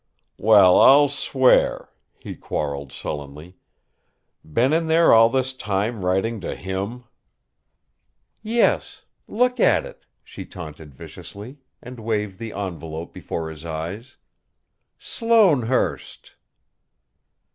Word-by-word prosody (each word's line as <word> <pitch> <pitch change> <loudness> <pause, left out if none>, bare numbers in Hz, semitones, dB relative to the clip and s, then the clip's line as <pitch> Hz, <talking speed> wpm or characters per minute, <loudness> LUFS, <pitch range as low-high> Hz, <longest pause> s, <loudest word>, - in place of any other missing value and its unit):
"Well, 100 -4 +6
I'll 145 +1 +6
swear!" 130 -2 +1 0.3
he - - -9
quarrelled 70 -2 -5
sullenly. 75 +5 -8 0.9
"Been 120 - 0
in 165 0 +1
there 165 +1 +4
all 115 0 +6
this 130 +1 -1
time 105 -2 -3
writing 95 +4 -1
to - - -5
him!" 100 +6 -5 1.4
"Yes! 225 +2 0 0.2
Look 250 +3 0
at - - +3
it!" - - -14 0.2
she - - -10
taunted 75 -4 -11
viciously, 110 - -11 0.2
and 125 -1 -10
waved 105 -4 -3
the 115 -1 -6
envelope 85 -5 -6
before 80 -1 -6
his 80 0 -12
eyes. 85 - -7 0.8
"Sloanehurst!" 185 - 0
105 Hz, 105 wpm, -22 LUFS, 85-130 Hz, 1.4 s, Well